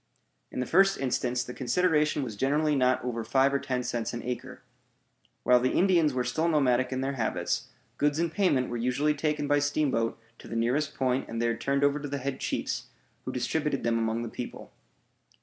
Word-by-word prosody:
In 125 - -4
the - - -1
first 195 +5 +4
instance, 125 -2 0
the 125 - -8
consideration 150 +3 +1
was 115 -5 -5
generally 145 +6 +1
not 130 -2 +2
over 115 -2 -2
five 135 +3 +2
or 140 - +2
ten 125 -2 -2
cents 120 -1 -2
an 120 - -5
acre. 125 -1 -6 0.8
While 125 0 +5
the 130 +1 0
Indians 175 -5 +4
were 130 -1 -1
still 125 +7 0
nomadic 130 -5 +2
in 130 0 -1
their 135 0 -2
habits, 110 - -1 0.3
goods 145 0 +2
in 170 0 0
payment 160 -10 +2
were 120 - -3
usually 125 +6 +1
taken 150 0 -1
by 145 0 +3
steamboat 145 -6 0 0.2
to - - -12
the - - -6
nearest 130 +6 0
point 130 0 0
and 115 - -4
there 115 0 +1
turned 140 +5 0
over 145 +1 +3
to 145 - -5
the 140 - -2
head 135 0 -4
chiefs, - - -2 0.4
who - - -3
distributed 145 +3 -1
them 115 -1 +1
among 115 +1 -1
the - - -4
people. - - -7
130 Hz, 200 wpm, -28 LUFS, 125-150 Hz, 0.8 s, While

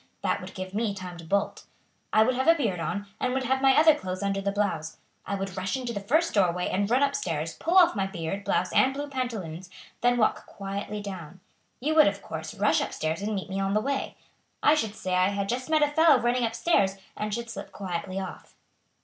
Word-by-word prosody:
That - - 0
would - - -9
give 185 0 -6
me 210 -1 -1
time 180 -2 -7
to - - -9
bolt. 200 +5 -1 0.5
I 215 - +6
would 255 +3 +2
have 260 +3 -1
a 330 - +7
beard 220 - -1
on, 200 +4 -3
and 250 - 0
would 265 - 0
have 265 +1 +1
my 270 -1 +5
other 315 +1 +7
clothes 185 -8 -5
under 195 0 0
the 200 0 0
blouse. 190 -6 -2 0.3
I 200 - -1
would 195 -2 -4
rush 190 +7 -2
into 245 -2 -4
the 200 - -3
first 310 +12 +1
doorway 180 -3 +2
and 200 +2 0
run 255 +4 +3
up 280 0 +2
stairs, 165 - -2
pull 345 +3 0
off 350 -9 +6
my 195 -2 0
beard, 195 +1 -4
blouse, 185 -1 0
and 265 +1 +4
blue 290 +1 -4
pantaloons, 215 - -4
and 185 - -23 0.4
then - - -1
walk 215 - +1
quietly 200 +1 -5
down. 185 -3 -8 0.4
You 300 +5 0
would, 310 -1 +7
of 200 0 -2
course, 160 -1 -6
rush 205 - +2
up - - -3
stairs 160 +3 -2
and 210 +1 -2
meet 190 - -4
me 195 - -2
on 195 +1 0
the - - +4
way. 275 +4 -2 0.5
I 295 - +6
should 220 -9 -1
say 185 -3 -3
I 185 +1 +4
had 200 0 -2
just 255 +6 -3
met 310 -1 +4
a - - +5
fellow 305 -2 +5
running 240 0 +1
up 225 0 -3
stairs, 195 - +2 0.2
and 210 0 -3
should 235 +2 -4
slip 200 -2 -8
quietly 185 0 -4
off." 190 -2 -8
200 Hz, 240 wpm, -27 LUFS, 185-255 Hz, 0.5 s, a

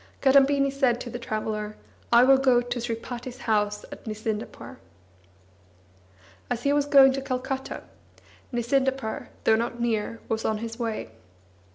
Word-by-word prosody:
Kadambini 275 0 +4
said 260 -4 +2
to 240 - -6
the 245 - -5
traveller: 215 -2 -3 0.4
"I 235 +1 +7
will 265 +1 +6
go 260 -2 +4
to 245 0 -3
Sripati's 240 +2 -5
house 210 -2 0
at - - -10
Nisindapur." 220 +3 -5 1.7
As 245 -1 -2
he 280 - +2
was 290 0 +1
going 270 -2 +7
to 270 - -3
Calcutta, 265 0 -4 0.7
Nisindapur, 265 0 -1 0.2
though 220 - +5
not 235 +1 -2
near, 230 -1 -1
was 225 0 -2
on 220 - 0
his 230 +2 -6
way. 225 - -3
240 Hz, 140 wpm, -26 LUFS, 225-265 Hz, 1.7 s, I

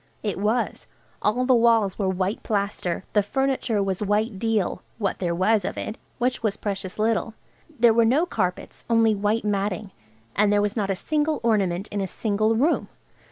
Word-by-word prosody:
It 205 -3 -2
was. 220 +4 -1 0.3
All 245 +5 +1
the 260 - +4
walls 230 -5 +3
were 195 -2 +1
white 190 +2 -1
plaster, 200 -4 -2
the 210 - +4
furniture 255 -1 0
was 190 -1 -2
white 210 0 0
deal–what 215 -1 -2
there 175 -2 -1
was 205 +3 +2
of - - -4
it, 215 - -4 0.2
which 250 +1 0
was 215 -2 0
precious 195 -2 -4
little. 220 +1 0 0.4
There 235 -1 +6
were 230 +1 +4
no 265 +9 +3
carpets–only 225 - 0
white 210 +2 0
matting. 200 -1 -1 0.4
And 205 0 +3
there 205 - +4
was 205 0 0
not 205 -4 -1
a 195 - +1
single 305 +8 0
ornament 200 -4 +1
in 205 - -2
a 190 - -1
single 215 +3 0
room! 290 +9 +2
210 Hz, 170 wpm, -24 LUFS, 195-230 Hz, 0.4 s, There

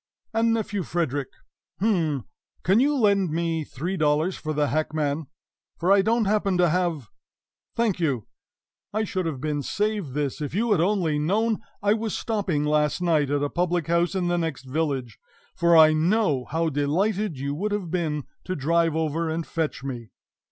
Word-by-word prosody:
And, 225 +1 +2
Nephew 215 -3 -1
Frederick 145 -5 -1 0.5
h'm! 165 - +1 0.4
can 195 +5 +4
you 290 +3 +3
lend 200 -6 +3
me 165 0 -1
three 170 +7 -4
dollars 155 +3 +2
for 155 - -4
the 150 -1 +1
hackman? 155 -1 -1 0.5
For 175 +3 +1
I 200 0 +6
don't 225 +2 +2
happen 200 -2 +1
to 175 -1 +4
have 165 - -1 0.7
Thank 225 -6 +1
you! 140 - 0 0.7
I 215 +1 +1
should 185 -4 -2
have 145 -5 -3
been 150 +1 -2
saved 205 -2 -2
this 145 0 -2
if 150 +2 -4
you 230 +2 +1
had 190 -6 +4
only 175 -5 +1
known 210 +8 +1 0.2
I 205 0 +4
was 220 0 -2
stopping 195 -10 -1
last 150 +1 +1
night 160 -5 +2
at 145 0 0
a 145 - 0
public 175 -2 0
house 170 +3 +1
in 180 -2 0
the 175 0 +1
next 160 -5 -3
village, 135 -4 -2 0.4
for 170 -1 +4
I 155 -1 +8
know 155 - +2
how 165 +1 0
delighted 175 +6 0
you 140 +2 -3
would 205 +8 -2
have 200 -5 -2
been 155 -5 -1 0.2
to 185 - -2
drive 165 +2 +1
over 160 +1 -1
and 160 +1 -2
fetch 160 -5 -3
me!" 120 -5 -6
165 Hz, 175 wpm, -25 LUFS, 150-195 Hz, 0.7 s, I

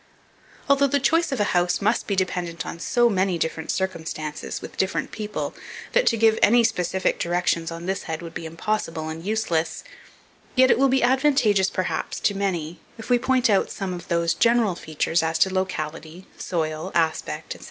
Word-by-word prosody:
Although 280 0 +4
the 285 +1 +1
choice 325 +3 +2
of 270 - -2
a - - +3
house 175 0 +2
must 215 +4 0
be 200 - 0
dependent 180 -3 -2
on 170 - -6
so 240 +6 +2
many 190 -4 +1
different 160 0 -3
circumstances 160 -5 -3
with - - -10
different 190 - -1
people, 210 -1 -4 0.4
that - - +2
to 230 - +3
give 220 0 +4
any 235 +2 +6
specific 185 -3 0
directions 170 -1 0
on 170 0 -7
this 190 +1 -2
head 160 +1 -3
would 165 - -8
be 165 - -5
impossible 165 -2 -3
and 160 +1 -6
useless; 195 -6 -1 0.7
yet 260 0 +6
it - - +3
will 275 0 +4
be 265 0 +2
advantageous, 245 -7 +3
perhaps, 185 - -3
to 205 - +2
many, 175 -5 -2 0.2
if 225 +2 -7
we 245 - +5
point 260 0 +2
out 200 -3 +2
some 190 -2 -4
of 175 - -8
those 170 -1 +1
general 235 -4 +3
features 160 0 -1
as 160 0 0
to 190 +3 +3
locality, 170 -1 -4
soil, 160 0 -3
aspect, 160 -2 -1
&c. - - -14
185 Hz, 185 wpm, -24 LUFS, 165-225 Hz, 0.7 s, any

